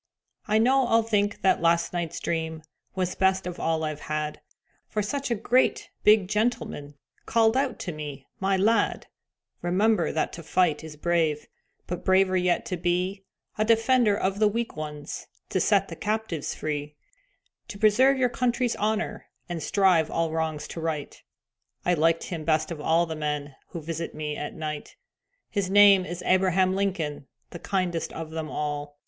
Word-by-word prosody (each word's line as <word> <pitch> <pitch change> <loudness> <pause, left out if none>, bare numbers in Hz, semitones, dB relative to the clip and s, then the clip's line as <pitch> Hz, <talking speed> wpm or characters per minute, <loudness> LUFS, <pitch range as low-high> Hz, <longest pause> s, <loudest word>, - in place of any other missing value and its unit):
I 215 - +3
know 255 +3 +4
I'll 225 -1 +4
think 205 -2 0
that 190 - +3
last 170 +1 +2
night's 170 -2 -3
dream 160 -1 -3 0.3
Was 185 -1 -1
best 190 0 +1
of 180 -1 -5
all 160 -1 0
I've 155 -1 -3
had, 150 0 -4 0.5
For 210 - -2
such 275 +7 -3
a 235 - +1
great, 240 +4 +1
big 210 -3 +5
gentleman 210 -9 -2 0.3
Called 225 0 +3
out 265 -2 0
to 180 - -3
me, 145 -3 -7
"My 195 0 +1
lad, 220 +4 +2 0.6
Remember 190 +2 +2
that 155 - -1
to 170 - -7
fight 165 -1 +1
is 160 -1 -9
brave, 160 -1 0 0.4
But 180 - -5
braver 190 0 +3
yet 180 +3 +1
to 190 -6 -3
be 180 +3 -1 0.3
A - - +4
defender 225 -1 +3
of 195 +1 -1
the 215 - +5
weak 230 +3 -2
ones, 150 -1 -6 0.2
To - - 0
set - - +3
the - - -7
captives 215 -7 -2
free, 150 -1 -4 0.7
To 200 - -8
preserve 245 +6 +4
your 255 -1 +3
country's 245 0 0
honor, 215 +1 -2 0.2
And 175 -2 -4
strive 175 0 +3
all 165 -1 -1
wrongs 160 -2 -2
to - - -6
right." 155 -3 -4 0.6
I 180 - +3
liked 165 0 +2
him 165 -3 -5
best 155 +1 +1
of 155 -3 -5
all 165 +3 +3
the 160 -1 -5
men 150 -2 -3
Who 170 - -7
visit 165 +1 -4
me 150 -1 -3
at 150 - -5
night. 155 -2 -5 0.6
His 200 -3 -1
name 200 -1 +7
is 175 +1 -6
Abraham 185 0 +3
Lincoln, 165 -8 -2 0.2
The 175 - -8
kindest 175 -2 -1
of 160 -1 -6
them 160 -1 -4
all. 145 -1 -4
180 Hz, 170 wpm, -26 LUFS, 155-210 Hz, 0.7 s, name